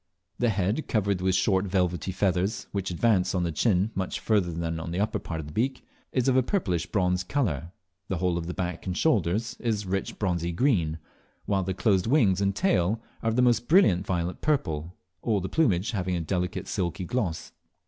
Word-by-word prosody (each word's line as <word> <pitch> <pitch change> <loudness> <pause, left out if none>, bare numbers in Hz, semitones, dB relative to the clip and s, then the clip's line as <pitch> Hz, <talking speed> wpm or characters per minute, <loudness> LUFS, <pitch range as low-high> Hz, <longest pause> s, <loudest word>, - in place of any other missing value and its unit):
The 120 - +3
head, 105 +7 0
covered 100 -4 0
with 95 0 +2
short 95 0 +2
velvety 90 -1 0
feathers, 95 +2 0
which 95 -2 -2
advance 95 0 +2
on 90 - +1
the 85 -2 -2
chic 100 +3 +2
much 95 -1 -2
further 100 -6 +1
than 80 0 -3
on 80 - -5
the 85 +2 -2
upper 105 +1 0
part 80 -4 -5
of 80 - -5
the 75 - -10
beak, 130 - -1 0.3
is 130 -1 +1
of 130 - +4
a 130 - +5
purplish 100 - -1
bronze 90 -3 +1
colour; 90 - -1 0.4
the 95 - -2
whole 90 -1 +1
of 85 - -6
the 90 - -3
back 90 -2 -4
and 90 0 -2
shoulders 110 - +1
is 110 -4 -1
rich 95 +1 -2
bronzy 85 -4 -1
green, 85 - +1 0.5
while 100 -2 +1
the 95 0 -2
closed 95 -3 +2
wings 110 -9 +3
and 100 -1 +1
tail 105 - +2 0.2
are 115 - +1
of 110 - -1
the 125 - +4
most 120 -1 +3
brilliant 150 - +5
violet 90 -2 -2
purple, 85 - -1 0.3
all 110 -4 +1
the 95 - -3
plumage 105 - +2
having 95 -4 -1
a 85 - -1
delicate 90 +2 -2
silky 90 -1 -2
gloss. 95 -6 -2
95 Hz, 200 wpm, -27 LUFS, 90-110 Hz, 0.5 s, a